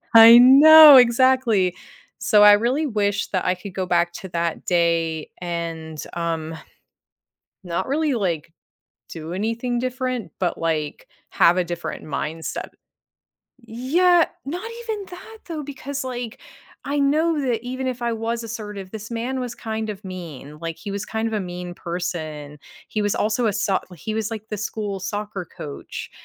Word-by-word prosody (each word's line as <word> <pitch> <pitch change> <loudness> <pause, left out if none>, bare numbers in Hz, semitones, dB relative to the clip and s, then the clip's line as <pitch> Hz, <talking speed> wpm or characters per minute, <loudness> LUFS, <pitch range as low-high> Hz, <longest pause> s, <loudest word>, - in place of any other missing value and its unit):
I 230 +1 +11
know, 295 +3 +10
exactly. 240 -6 +4 0.4
So, 210 -1 +4
I 210 0 +9
really 250 +9 +1
wish 205 -4 -1
that 185 -2 0
I 180 - +2
could 190 +1 -10
go 190 -1 -2
back 175 0 +1
to 190 - -9
that 170 -1 -2
day, 165 -2 +1
and, 165 -2 -5 0.2
um, 165 -1 -3 1.1
not 175 +7 -3
really, 295 0 0
like, 170 -8 -2 0.6
do 160 0 -7
anything 230 +4 -2
different, 255 - -3
but, 180 -2 -1
like, 155 -2 -3 0.2
have 175 +2 +4
a 180 - +2
different 175 0 -6
mindset. 155 +2 -4 0.9
Yeah, 285 +10 +2 0.2
not 360 +11 -5
even 430 -4 -5
that 445 +5 -11
though, 320 -4 -5
because, 280 0 -6
like, 245 -1 -6 0.4
I 285 +1 -2
know 310 +3 +2
that 245 -3 -1
even 255 +1 -4
if 245 -1 -5
I 235 - 0
was 230 +1 -3
assertive, 210 -4 -7
this 220 +1 -8
man 240 +3 -3
was 245 -1 -5
kind 220 -1 -4
of 205 -1 -9
mean, 160 -6 -9
like, 165 -1 -5
he 205 - -7
was 200 +1 -4
kind 220 +1 -3
of 225 - -4
a 210 - 0
mean 180 -1 -6
person. 155 -5 -5 0.3
He 215 - -2
was 205 -1 0
also 220 +3 0
a 205 - 0
soc 195 -2 0
he 215 +7 -5
was, 220 0 -2
like, 220 -1 -7
the 210 - -2
school 205 -2 -4
soccer 205 -1 -5
coach, 145 -1 -7
210 Hz, 160 wpm, -22 LUFS, 175-255 Hz, 1.1 s, I